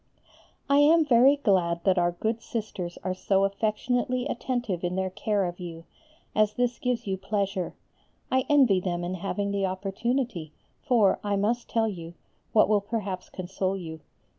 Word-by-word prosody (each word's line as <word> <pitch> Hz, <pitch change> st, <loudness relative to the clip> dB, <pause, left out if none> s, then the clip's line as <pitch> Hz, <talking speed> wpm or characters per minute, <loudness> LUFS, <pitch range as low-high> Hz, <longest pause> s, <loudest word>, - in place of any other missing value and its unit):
I 280 Hz, +1 st, +4 dB
am 315 Hz, +2 st, +6 dB
very 265 Hz, +1 st, +6 dB
glad 180 Hz, -10 st, +1 dB
that 190 Hz, -2 st, +3 dB
our 175 Hz, 0 st, +2 dB
good 220 Hz, +6 st, -2 dB
Sisters 210 Hz, -9 st, -5 dB
are 185 Hz, -, -1 dB
so 195 Hz, +1 st, +1 dB
affectionately 240 Hz, +5 st, 0 dB
attentive 240 Hz, -9 st, -2 dB
in 175 Hz, 0 st, -1 dB
their 190 Hz, 0 st, -1 dB
care 205 Hz, 0 st, 0 dB
of 175 Hz, +1 st, -5 dB
you, 165 Hz, -2 st, -7 dB, 0.5 s
as 215 Hz, 0 st, +2 dB
this 245 Hz, -1 st, 0 dB
gives 250 Hz, -2 st, -1 dB
you 190 Hz, -2 st, -2 dB
pleasure. 195 Hz, -2 st, -2 dB, 0.6 s
I 260 Hz, 0 st, +2 dB
envy 260 Hz, -10 st, +5 dB
them 175 Hz, -1 st, -2 dB
in 175 Hz, +1 st, -3 dB
having 200 Hz, +2 st, -2 dB
the 200 Hz, -1 st, 0 dB
opportunity, 195 Hz, -, -2 dB, 0.3 s
for, 230 Hz, -8 st, +3 dB
I 205 Hz, -1 st, 0 dB
must 225 Hz, +5 st, 0 dB
tell 225 Hz, -1 st, +1 dB
you, 170 Hz, -4 st, -7 dB, 0.4 s
what 215 Hz, -, +5 dB
will 210 Hz, -1 st, +3 dB
perhaps 200 Hz, -3 st, -4 dB
console 190 Hz, +1 st, -3 dB
you. 160 Hz, -3 st, -7 dB
200 Hz, 165 wpm, -27 LUFS, 185-235 Hz, 0.6 s, am